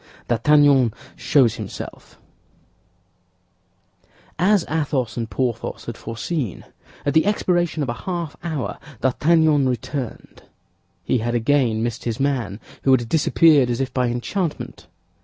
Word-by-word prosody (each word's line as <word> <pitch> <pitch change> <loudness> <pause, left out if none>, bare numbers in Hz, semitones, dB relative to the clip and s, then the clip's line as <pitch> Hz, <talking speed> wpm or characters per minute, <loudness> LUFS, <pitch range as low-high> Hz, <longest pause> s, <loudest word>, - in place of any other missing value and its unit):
D'ARTAGNAN 135 0 +4 0.2
SHOWS 130 -6 +3
HIMSELF - - -8 2.2
As 195 0 +3
Athos 140 -7 -1
and 115 -2 -3
Porthos 115 +3 -3
had - - -5
foreseen, 115 - -4 0.4
at 145 - +1
the 160 +6 +4
expiration 175 -6 +1
of 130 - -3
a - - 0 0.2
half 170 -4 -3
hour, 155 -6 -3 0.2
D'Artagnan 150 +1 +3
returned. 125 +1 -5 0.6
He 125 - +1
had 120 +2 -1
again 120 -2 +2
missed 120 -1 -3
his 115 -2 -2
man, 125 -8 -1 0.2
who - - 0
had 125 -3 +4
disappeared 150 -3 +4
as 120 - -1
if 135 -1 -2
by 125 -1 +1
enchantment. 125 - -3
135 Hz, 120 wpm, -22 LUFS, 120-155 Hz, 2.2 s, D'ARTAGNAN